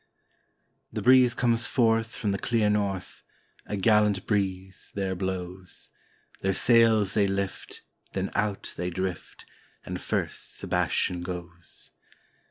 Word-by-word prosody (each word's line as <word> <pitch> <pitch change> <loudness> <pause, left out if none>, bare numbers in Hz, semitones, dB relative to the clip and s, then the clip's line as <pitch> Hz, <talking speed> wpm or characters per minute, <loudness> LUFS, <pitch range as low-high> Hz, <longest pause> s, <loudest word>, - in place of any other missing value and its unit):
The 105 - -4
breeze 125 0 +6
comes 115 -2 +2
forth 115 -1 +1
from 105 - -1
the 100 - -2
clear 110 -3 +1
north, 100 -3 -2 0.5
a 105 - -3
gallant 105 -1 +3
breeze 95 -2 -2
there 95 -1 -1
blows; 95 0 -6 0.5
Their 95 0 0
sails 115 -4 +5
they 100 -2 +3
lift, 100 0 -4 0.3
then - - -2
out 100 -1 -2
they 90 - -2
drift, 95 0 -5 0.4
and - - -5
first - - -3
Sebas - - -1
tian 90 -1 0
goes. 85 -1 -9
100 Hz, 125 wpm, -27 LUFS, 95-110 Hz, 0.5 s, breeze